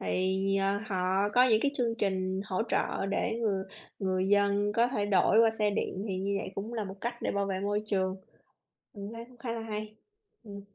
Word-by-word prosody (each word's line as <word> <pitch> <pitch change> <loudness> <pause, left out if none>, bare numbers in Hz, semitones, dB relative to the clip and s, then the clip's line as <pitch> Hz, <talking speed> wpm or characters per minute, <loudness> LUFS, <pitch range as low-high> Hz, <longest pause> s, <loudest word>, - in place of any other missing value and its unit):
thì, 185 +1 0 0.2
ờ, 195 +1 +1
họ 190 0 +1
có 250 - +7
những 220 -4 +4
cái 280 - +3
chương 235 -3 +1
trình 190 -1 0
hỗ 190 0 -1
trợ 195 - 0
để 225 +3 -1
người 195 -4 0 0.3
người 185 -1 0
dân 205 0 +3
có 235 +3 +3
thể 210 -5 -1
đổi 205 +2 +4
qua 225 -1 +6
xe 215 -2 +1
điện 200 0 -2
thì 190 - -1
như 200 +1 -1
vậy - - -5
cũng 210 +4 -5
là 220 -3 -2
một 190 0 -7
cách 240 +2 -2
để - - 0
bảo 200 0 0
vệ 190 -1 -2
môi 205 +1 0
trường. 190 -2 0 0.8
Mình 200 +1 -7
thấy 230 0 -7
cũng 245 +1 -18
khá 230 -1 -4
là 230 - -4
hay. 215 -1 -5 0.5
Ừm. 200 -2 -8
205 Hz, 220 wpm, -30 LUFS, 195-225 Hz, 0.8 s, có